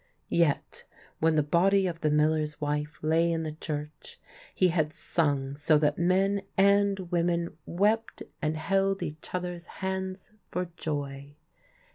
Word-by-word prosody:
Yet 165 -4 +1 0.4
when 160 0 +3
the 150 - +3
body 190 +6 +3
of 170 -2 -3
the 155 - +2
miller's 150 0 +1
wife 150 0 -2
lay 165 +2 +3
in 165 -1 -1
the 155 - -3
church, 150 -1 -6 0.4
he 185 - +4
had 155 -3 0
sung 140 -4 0
so 150 +1 +3
that 150 0 +1
men 190 +3 +2 0.2
and 200 0 +4
women 170 -1 0
wept 210 +6 0 0.2
and 155 -1 0
held 195 +4 +1
each 150 +1 -7
other's 180 -1 -4 0.2
hands 190 0 -3 0.2
for 180 -1 -3
joy. 140 -3 -4
165 Hz, 140 wpm, -28 LUFS, 150-185 Hz, 0.4 s, he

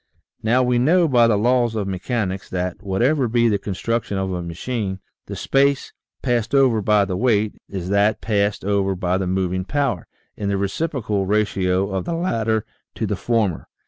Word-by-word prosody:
Now, 120 +4 +3
we 125 -1 +2
know, 165 +7 +4
by 120 -5 +5
the 110 -3 +3
laws 120 +1 +2
of 105 -3 -2
mechanics, 95 0 -3
that, 90 0 -3
whatever 120 +8 +1
be 120 +1 +2
the 105 -3 +1
construction 105 +1 -2
of 95 0 -2
a 90 -1 -2
machine, 95 +4 -4 0.3
the - - -5
space 140 0 +1 0.3
passed 120 0 0
over 130 -5 +4
by 105 0 +3
the 95 -2 -3
weight, 110 -1 +1 0.2
is 95 -3 -4
to 90 - -5
that 100 +2 +3
passed 100 -3 0
over 100 -1 +1
by 90 0 0
the 95 - -2
moving 95 0 -1
power, 135 - -1 0.3
in 100 -2 -3
the 100 - 0
reciprocal 105 - -1
ratio 100 -2 +1
of 95 -1 -2
the 170 - -2
latter 115 - 0 0.3
to - - -2
the - - -1
former. 110 -8 -1
105 Hz, 180 wpm, -21 LUFS, 95-120 Hz, 0.3 s, by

